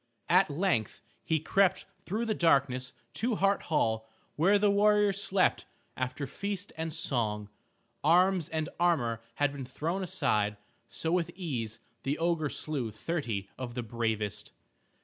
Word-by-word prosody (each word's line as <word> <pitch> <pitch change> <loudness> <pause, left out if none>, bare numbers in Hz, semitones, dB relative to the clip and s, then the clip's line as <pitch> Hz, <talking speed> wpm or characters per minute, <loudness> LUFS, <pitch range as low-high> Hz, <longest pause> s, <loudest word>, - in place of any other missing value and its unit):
At 185 +1 +5
length 140 - 0 0.2
he 160 -1 +1
crept 190 +4 +2 0.2
through 215 +5 -1
the 220 - +1
darkness 135 -8 +2 0.2
to 235 0 0
Hart 200 0 +2
Hall 110 -7 +1 0.3
where 190 +7 +5
the 205 0 +3
warriors 205 -1 +4
slept 195 -2 +2 0.3
after 130 +2 -2
feast 200 +7 -4
and 160 0 -3
song. 110 -9 -1 0.5
Arms 180 +1 +4
and 160 -1 -1
armor 125 -10 +2
had 145 -1 +2
been 140 -1 -6
thrown 160 +9 -3
aside, 105 - +1 0.3
so 160 - -1
with 175 -1 +1
ease 120 - -3 0.2
the 135 +3 -1
ogre 165 -3 +1
slew 140 -7 -2
thirty 110 - -3
of 120 -2 -5
the 125 - -2
bravest. 110 -2 -2
155 Hz, 140 wpm, -30 LUFS, 120-185 Hz, 0.5 s, At